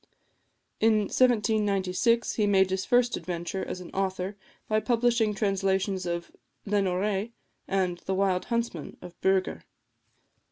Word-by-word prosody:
In 220 -1 +4
1796 215 -1 +2
he 210 -2 +1
made 190 -2 +3
his 190 0 -1
first 245 0 +3
adventure 175 +2 -4
as 180 - -5
an 180 - -10
author 190 0 -2 0.3
by 215 0 +2
publishing 230 -1 +1
translations 195 -2 0
of 170 0 -3 0.3
"Lenoré," 200 +2 0 0.3
and 185 -2 0
"The 190 - -3
Wild 190 -1 +1
Huntsman" 235 -9 -3
of 180 -1 -9
Bürger. 190 -1 +1
195 Hz, 120 wpm, -27 LUFS, 185-215 Hz, 0.3 s, In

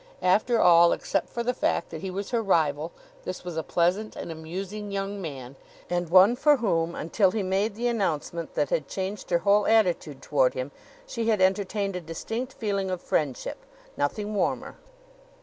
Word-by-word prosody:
After 215 +6 +3
all, 170 -2 +6
except - - -2
for 235 - -3
the 250 +1 0
fact 170 - -1
that 160 - -6
he 190 - -4
was 195 +2 -5
her 235 -2 +1
rival, 160 -5 +1 0.3
this - - -6
was 175 -2 -6
a 160 - 0
pleasant 180 +7 0
and - - -6
amusing 190 +6 -6
young 200 0 -3
man, 135 -6 -7 0.4
and 175 -1 -1
one 190 +6 +7
for 295 +3 +4
whom, 170 -8 0
until 190 +4 +2
he 210 +1 -2
made 195 +3 0
the 235 +3 -3
announcement 170 -7 -2
that 145 -2 0
had 150 -4 0
changed 190 +4 -5
her 175 - +3
whole 205 +1 +4
attitude 180 -10 +2
toward 135 -2 +1
him, 130 +2 -4 0.3
she 230 - -2
had 215 -3 +2
entertained 195 +1 +1
a 180 - -3
distinct 225 +10 -5
feeling 200 -5 -2
of 185 -1 -2
friendship 140 -6 -2 0.3
nothing 205 +9 -2
warmer. 205 - -1
190 Hz, 180 wpm, -26 LUFS, 165-210 Hz, 0.4 s, one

